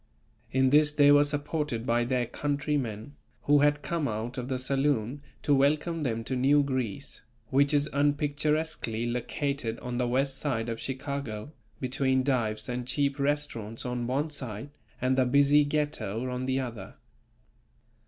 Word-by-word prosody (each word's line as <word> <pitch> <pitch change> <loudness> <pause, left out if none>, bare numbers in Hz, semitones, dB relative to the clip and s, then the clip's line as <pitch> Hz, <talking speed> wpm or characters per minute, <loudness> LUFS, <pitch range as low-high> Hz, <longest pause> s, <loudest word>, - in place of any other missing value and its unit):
In 130 0 +3
this 150 +1 +5
they 145 -1 +5
were 145 0 +7
supported 145 -4 -2
by 120 0 +2
their 125 0 0
countrymen 140 -4 -2 0.3
who 145 0 +5
had 145 0 +3
come 165 -4 -1
out 115 +3 -3
of 125 -1 -4
the 130 -1 -1
saloon 135 -1 0 0.2
to 145 - +3
welcome 150 +4 +2
them 115 -5 -1
to 130 - -3
New 140 +3 +4
Greece, 130 -2 -3 0.3
which 140 +2 +4
is 145 0 +2
unpicturesquely 145 -4 0
located 125 0 -2
on 125 0 -3
the 125 - +1
West 135 +2 0
side 120 -6 -1
of 115 -1 -3
Chicago, 135 -3 -4 0.3
between 130 0 +1
dives 110 -5 0
and 125 0 -3
cheap 140 +1 0
restaurants 140 -7 -2
on 125 -1 -2
one 145 +5 -1
side, 130 -2 -6 0.3
and 130 +1 +1
the 130 - +4
busy 140 +3 +5
Ghetto 145 -7 -2
on 125 +1 -3
the 130 0 +1
other. 115 -7 -6
135 Hz, 155 wpm, -28 LUFS, 120-145 Hz, 0.3 s, were